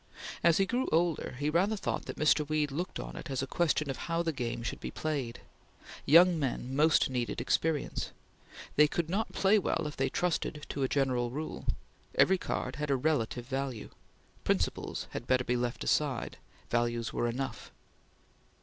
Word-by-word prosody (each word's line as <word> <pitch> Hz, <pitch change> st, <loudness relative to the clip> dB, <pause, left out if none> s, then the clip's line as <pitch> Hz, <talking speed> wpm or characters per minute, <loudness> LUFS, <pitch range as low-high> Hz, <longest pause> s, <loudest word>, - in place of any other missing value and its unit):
As 170 Hz, -2 st, +5 dB
he 195 Hz, -, +4 dB
grew 245 Hz, +6 st, 0 dB
older 165 Hz, -4 st, +1 dB
he 145 Hz, +3 st, 0 dB
rather 190 Hz, +7 st, +2 dB
thought -, -, -2 dB
that -, -, -5 dB
Mr. 150 Hz, -1 st, +3 dB
Weed 150 Hz, -2 st, +1 dB
looked 170 Hz, +6 st, -3 dB
on -, -, -6 dB
it -, -, -7 dB
as 135 Hz, -1 st, -1 dB
a -, -, 0 dB
question 155 Hz, +1 st, +1 dB
of 135 Hz, -, -3 dB
how 165 Hz, 0 st, -1 dB
the 165 Hz, -, 0 dB
game 120 Hz, -3 st, -3 dB
should -, -, -3 dB
be -, -, -5 dB
played. 140 Hz, -7 st, -3 dB, 0.7 s
Young 170 Hz, +3 st, +7 dB
men 130 Hz, -2 st, -2 dB
most 155 Hz, +2 st, +4 dB
needed 125 Hz, -2 st, -2 dB
experience. 150 Hz, +5 st, 0 dB, 0.7 s
They 150 Hz, 0 st, +7 dB
could 165 Hz, +2 st, -2 dB
not 220 Hz, +4 st, 0 dB
play 200 Hz, +2 st, +4 dB
well 170 Hz, -3 st, 0 dB
if 150 Hz, -, -4 dB
they 135 Hz, -, 0 dB
trusted 160 Hz, -4 st, -1 dB
to 140 Hz, -, -3 dB
a 135 Hz, -, +3 dB
general 130 Hz, -4 st, +1 dB
rule. 150 Hz, +6 st, -5 dB, 0.5 s
Every 190 Hz, 0 st, +5 dB
card -, -, -3 dB
had 150 Hz, -1 st, -3 dB
a 140 Hz, -, +3 dB
relative 125 Hz, -4 st, 0 dB
value. 130 Hz, -3 st, -4 dB, 0.5 s
Principles -, -, -1 dB
had -, -, -6 dB
better 130 Hz, 0 st, +3 dB
be 125 Hz, -, 0 dB
left 120 Hz, 0 st, -2 dB
aside; 140 Hz, -5 st, 0 dB, 0.3 s
values 120 Hz, -1 st, 0 dB
were 120 Hz, -, 0 dB
enough. 130 Hz, -1 st, -4 dB
145 Hz, 175 wpm, -31 LUFS, 125-165 Hz, 0.7 s, Young